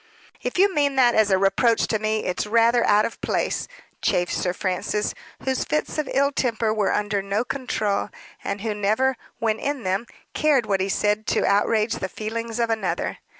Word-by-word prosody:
"If - - -3
you 390 +1 +4
mean 285 -3 +1
that 245 -2 +5
as 220 -1 +3
a 190 - +4
reproach 195 +4 +3
to 220 - -1
me, 215 0 -1
it's 180 +3 -2
rather 230 +2 +4
out 210 0 +4
of - - -6
place," - - -1 0.3
chafed 175 0 +1
Sir 180 - 0
Francis, 185 +3 -2 0.3
whose 265 -1 0
fits 150 - -2
of 300 - -2
ill 280 +1 +2
temper 230 -5 0
were 210 -2 +1
under 205 -1 0
no 200 +3 -1
control, 220 -7 -2 0.3
and 200 - -3
who 220 -1 -1
never, 215 +6 +1 0.2
when 220 -1 0
in 285 -3 -3
them, 190 +5 -1 0.3
cared 290 -6 +2
what 195 -3 0
he 195 - -1
said 210 +2 0
to - - +1
outrage 215 +2 +2
the 190 - -4
feelings 225 +2 -4
of 230 -1 +1
another. 220 -1 -2
220 Hz, 190 wpm, -23 LUFS, 200-240 Hz, 0.3 s, that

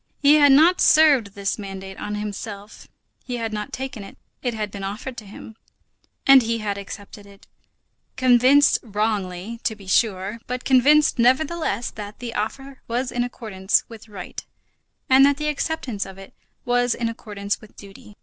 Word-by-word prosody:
He 295 +1 +6
had 290 -2 +6
not 325 +6 +5
served 280 -10 +5
this 200 +1 -2
mandate 195 -1 -8
on 210 - -4
himself; 210 0 -7 0.4
he 245 -1 -4
had 225 -2 -4
not 210 0 -5
taken 260 -5 -6
it; 195 - -13 0.2
it 245 -3 -2
had 210 -2 -4
been 200 -1 -7
offered 215 +6 -5
to 215 - -9
him, 215 +2 -11 0.7
and 270 -1 +8
he 230 0 -1
had 210 -2 -3
accepted 200 +1 -10
it; 200 0 -18 0.7
convinced, 255 +3 +5
wrongly, 210 -1 -3
to 220 - -1
be 200 -2 -15
sure, 195 +1 0
but 250 0 -4
convinced 285 +3 +4
nevertheless, 270 +2 +1
that 210 0 -9
the 240 -2 -6
offer 270 +6 -5
was 245 +2 -2
in 245 - -1
accordance 215 -5 -1
with 225 -1 -12
right 190 -4 -8 0.6
and 265 +1 +6
that 280 0 +4
the 300 0 -2
acceptance 280 -8 -3
of 190 0 -11
it 195 0 -13 0.3
was 245 0 +1
in 235 - -2
accordance 205 -3 -5
with 215 - -16
duty. 200 +1 -14
225 Hz, 170 wpm, -22 LUFS, 205-260 Hz, 0.7 s, and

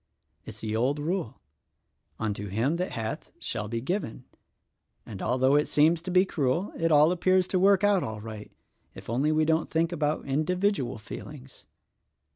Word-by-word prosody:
It's - - -10
the 110 0 -3
old 130 +6 +1
rule, 155 - -3 0.8
'Unto 105 -2 -3
him 115 - 0
that 180 +2 -3
hath 110 -1 -4
shall 105 - -4
be 115 +1 -3
given' 175 - -3 0.8
and, 100 -4 -8
although 130 +2 +2
it 150 - +3
seems 160 +3 +3
to 180 - -7
be 185 +1 +4
cruel, 160 +3 -1
it 165 0 0
all 150 +2 +6
appears 185 +1 +2
to 185 - +1
work 195 +1 +4
out 205 -2 +4
all 110 -1 -5
right 110 -1 -9 0.2
— - - -42
if - - -8
only 135 +6 +1
we 155 0 +2
don't 160 0 +1
think 165 +1 +1
about 150 -2 -1
individual 155 - 0
feelings." 130 +5 -10
150 Hz, 170 wpm, -27 LUFS, 115-175 Hz, 0.8 s, all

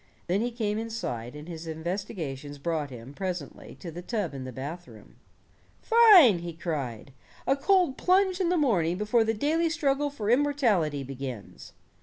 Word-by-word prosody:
Then 185 +4 0
he 240 - 0
came 220 -3 -2
inside, 150 - -5
and 150 +2 -9
his 165 -1 -7
investigations 160 -4 -5
brought 155 0 -2
him, 125 +1 -10
presently 180 -5 -6
to 170 - -6
the 175 +3 -7
tub 205 -4 -3
in 135 -2 -6
the 130 - -6
bathroom. 145 +8 -9 0.6
"Fine," 405 - +7
he 170 0 -6
cried, 140 -8 -5 0.3
"a 270 - +3
cold 350 -1 +2
plunge 375 0 +3
in 350 - +1
the 360 - +2
morning 180 - +2
before 215 +3 +2
the 225 0 0
daily 320 +8 +1
struggle 290 -2 0
for 225 -7 -2
immortality 235 - +2
begins." 130 -5 -8
185 Hz, 160 wpm, -27 LUFS, -, 0.6 s, Fine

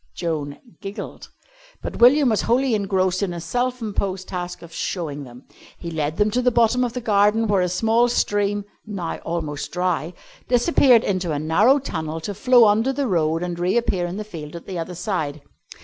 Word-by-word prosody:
Joan 150 -4 -3 0.2
giggled. 200 -1 -7 0.5
But - - -5
William 265 +3 +6
was 220 - +1
wholly 255 +1 +1
engrossed 190 -2 +1
in 190 -3 -1
his 170 -1 -6
self 250 +5 -2
imposed 195 -3 -3
task 180 -1 -5
of 165 -1 -12
"showing 150 -7 -4
them." 125 +1 -13 0.3
He 170 - -7
led 155 0 -2
them 210 0 +2
to 250 - +1
the 250 - +3
bottom 240 +1 +3
of 240 -2 -2
the 250 - -4
garden, 210 0 +3
where 200 -2 +2
a 180 - +1
small 225 +6 +2
stream 205 -3 0 0.2
(now 195 -6 -4
almost 155 -4 -4
dry) 180 -2 -1 0.3
disappeared 245 -1 +4
into 185 -4 -1
a - - -1
narrow 180 - +4
tunnel 160 - -4
to 200 +6 -4
flow 245 +4 +5
under 220 +5 +3
the 280 +1 -1
road 165 -5 +1
and 175 -1 -4
reappear 180 -1 +1
in 175 +3 -5
the 215 - -3
field 165 -7 -9
at 170 - -9
the 185 -3 -5
other 175 +2 -5
side. 155 -7 -3
190 Hz, 190 wpm, -22 LUFS, 170-225 Hz, 0.5 s, William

